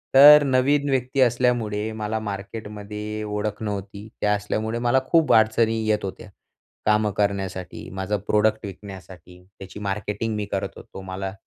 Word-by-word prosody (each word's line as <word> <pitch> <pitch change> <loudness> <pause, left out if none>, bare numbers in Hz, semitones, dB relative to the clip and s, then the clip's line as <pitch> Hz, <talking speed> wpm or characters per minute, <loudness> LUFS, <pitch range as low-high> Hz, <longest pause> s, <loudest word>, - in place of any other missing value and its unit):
तर 145 +2 +10
नवीन 140 +2 +2
व्यक्ती 130 0 -1
असल्यामुळे 120 -3 +1
मला 110 0 -3
मार्केटमध्ये 105 +1 -6
ओळख 105 0 -3
नव्हती. 100 0 -5
ते - - 0
असल्यामुळे 110 +2 -1
मला 120 +2 +3
खूप 165 -2 +4
अडचणी 110 0 +3
येत 105 -1 +1
होत्या, 100 +2 -8 0.6
कामं 105 0 +2
करण्यासाठी, 95 -4 -2
माझं 95 +4 -2
प्रोडक्ट 110 0 +2
विकण्यासाठी. 95 -2 -11 0.2
त्याची 95 +1 -9
मार्केटिंग 105 +2 -3
मी 105 -1 -2
करत 95 0 -3
होतो 95 - -11
मला 95 +1 -5
105 Hz, 135 wpm, -23 LUFS, 100-115 Hz, 0.6 s, तर